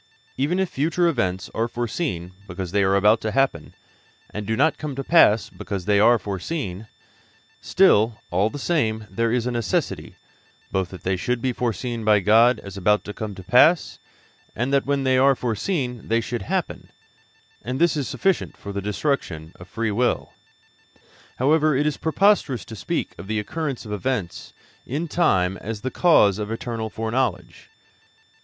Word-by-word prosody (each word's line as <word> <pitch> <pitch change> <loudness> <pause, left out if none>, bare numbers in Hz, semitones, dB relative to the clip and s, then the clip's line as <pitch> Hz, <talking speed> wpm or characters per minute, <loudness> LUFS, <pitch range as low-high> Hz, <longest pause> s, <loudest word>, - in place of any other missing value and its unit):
Even 150 +7 0
if 190 0 +1
future 165 +4 0
events 95 - -1
are 115 +1 0
foreseen 120 - -3 0.2
because 90 -1 -6
they 100 +1 +2
are 95 0 +2
about 105 +3 +4
to 110 - -2
happen, 110 - -1 0.6
and 105 -1 -6
do 110 - -1
not 160 - +2
come 150 -3 -5
to 135 - -4
pass 115 -9 +4
because 100 -4 -6
they 105 -1 +3
are 120 +3 +6
foreseen, 100 - -5 0.7
still, 115 - +3
all 95 +5 +2
the 145 - -7
same, 115 -9 -1
there 115 +3 0
is 120 -1 0
a 125 - -1
necessity, 115 -6 -2 0.6
both 95 -1 -1
that 95 - -11
they 95 +1 0
should 125 +7 -1
be 125 +1 -1
foreseen 120 0 -3
by 105 -1 +4
God 115 +5 +4
as 100 -1 -9
about 105 +2 +2
to 105 - -7
come 105 -3 -6
to 95 - -10
pass, 150 - +4 0.6
and 125 +5 -1
that 140 -1 +2
when 140 -1 0
they 130 -1 +3
are 135 +1 +5
foreseen 125 - -3
they 115 +1 +2
should 115 +1 -4
happen, 95 - -3 0.7
and 125 +3 -4
this 170 -1 +3
is 140 -5 -2
sufficient 190 - -1
for 100 - -8
the 100 - -3
destruction 100 - -2
of 90 - -11
free 115 +2 -2
will. 120 +4 0 1.0
However, 155 +3 +3
it 145 - +1
is 150 -2 0
preposterous 160 - +2
to 115 - -9
speak - - -3
of - - -8
the 110 +1 -1
occurrence 140 +4 -4
of 105 - -8
events 105 -3 -3 0.3
in 150 +7 -3
time 95 - +1
as 110 -1 -6
the 130 - -3
cause 105 - +4
of 105 0 -4
eternal 115 -1 -4
foreknowledge. 115 +4 -3
115 Hz, 175 wpm, -23 LUFS, 100-135 Hz, 1.0 s, are